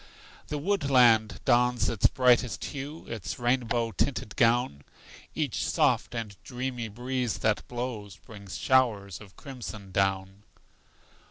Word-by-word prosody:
The 150 - -3
woodland 135 - +3
dons 125 -1 +3
its 110 - +3
brightest 125 -2 +2
hue, 145 +3 -7
Its 100 -4 -5
rainbow 120 -2 0
tinted 110 +1 -2
gown; 115 - +2 0.5
Each - - -1
soft - - +1
and 110 -4 -4
dreamy 125 -2 -4
breeze 125 +2 -2
that 110 -1 0
blows 120 -6 -5
Brings 100 -6 -10
showers 110 -8 +1
of 100 -2 -14
crimson 115 -8 -8
down. 95 0 -1
120 Hz, 115 wpm, -28 LUFS, 105-125 Hz, 0.5 s, woodland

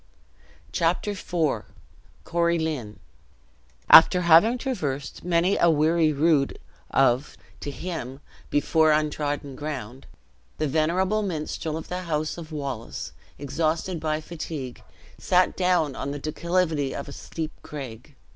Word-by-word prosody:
Chapter 175 +5 0
IV. 165 - -1 0.6
Corie 170 0 +1
Lynn. 150 -10 -3 0.9
After 180 +3 +9
having 175 +8 +6
traversed 145 - -4
many 175 +2 +2
a 170 - +5
weary 160 +1 +3
rood 150 -1 +2 0.3
of, 135 +1 +2 0.2
to - - -5
him, 140 -4 -5 0.3
before 155 +2 +3
untrodden 145 -2 -1
ground, 135 -4 -6 0.5
the 155 - 0
venerable 175 +8 +1
minstrel 160 -3 -3
of 160 - -7
the 180 +1 -3
house 155 -3 -2
of 160 -1 -9
Wallace, 135 -6 -5 0.3
exhausted 160 +5 -1
by 155 0 -1
fatigue, 155 -5 -6 0.4
sat 180 0 +2
down 180 -6 +1
on 140 - -4
the 145 - -4
declivity 155 -1 -1
of - - -5
a - - -8
steep 160 +2 -5
craig. 135 -1 -9
155 Hz, 120 wpm, -25 LUFS, 145-170 Hz, 0.9 s, After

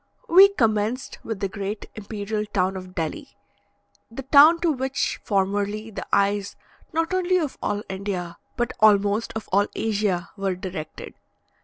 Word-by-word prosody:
We 380 +4 +9
commenced 230 - -1
with 220 -3 -5
the 200 - +1
great 200 +1 -5
imperial 210 0 -4
town 190 -2 0
of 185 -1 -9
Delhi; 170 - -5 0.7
the 235 +4 -7
town 295 +5 +7
to 340 -2 +3
which 265 -1 -2
formerly 205 +2 -1
the - - -7
eyes 200 0 +1 0.4
not 330 +2 -1
only 370 0 +2
of 310 -6 -3
all 205 0 -2
India, 190 -3 -5 0.2
but 240 0 -1
almost 205 0 +3
of 220 - -5
all 200 +2 +3
Asia, 205 -5 -1
were 195 -2 -1
directed. 180 -5 -7
210 Hz, 145 wpm, -24 LUFS, 195-250 Hz, 0.7 s, We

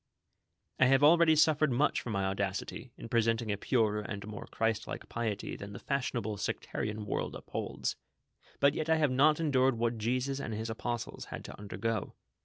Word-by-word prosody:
"I 130 - +6
have 135 +2 +4
already 165 +1 +7
suffered 155 -1 +4
much 130 +5 +2
for - - -6
my 100 -3 0
audacity, 95 +5 -3
in - - -8
presenting 115 -1 +1
a - - +1
purer 110 -2 +1
and 100 -1 -6
more 105 -1 -7
Christ 110 -1 -1
like - - -6
piety 110 -4 -3
than 100 0 -8
the - - -7
fashionable 120 -6 -2
sectarian 105 +1 -3
world 100 - -2
upholds, - - -3 0.6
but 140 0 +5
yet 155 +1 -2
I 160 - +5
have 150 -4 +2
not 150 +4 +4
endured 135 -5 +3
what 115 0 0
Jesus 130 +5 0
and 110 -5 -4
his 110 +1 -3
apostles 120 +1 -4
had - - -7
to - - -9
undergo. 105 +2 -3
115 Hz, 180 wpm, -31 LUFS, 105-135 Hz, 0.6 s, already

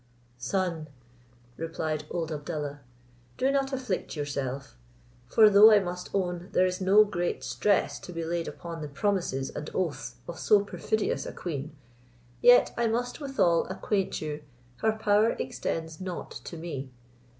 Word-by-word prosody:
"Son," 165 +4 -1 0.7
replied 160 -2 -3
old 165 -2 -3
Abdallah, 150 -1 -4 0.6
"do 265 +1 +2
not 275 0 +1
afflict 255 -12 -3
yourself; 140 - -4 0.5
for 220 -1 +7
though 210 +2 +9
I 210 - +8
must 180 -2 -3
own, 180 -2 -2
there 185 - +4
is 185 +1 -2
no 195 +3 +7
great 175 -4 -2
stress 205 -2 +1
to - - -9
be 165 -1 -4
laid 170 0 -2
upon 165 -1 -7
the 150 - -4
promises 145 -4 -1
and 150 +1 -6
oaths 175 -5 -2
of 170 - -7
so 205 -1 +4
perfidious 215 +1 -1
a - - -4
queen, 155 -3 -5 0.7
yet 245 0 +7
I 235 -1 +1
must 245 +6 -2
withal 225 - +2
acquaint 195 -3 -1
you, 150 0 -4 0.4
her 220 0 +2
power 215 +1 +3
extends 160 +1 -4
not 185 -2 -5
to 170 - -8
me. 145 -5 -5
175 Hz, 150 wpm, -28 LUFS, 155-210 Hz, 0.7 s, though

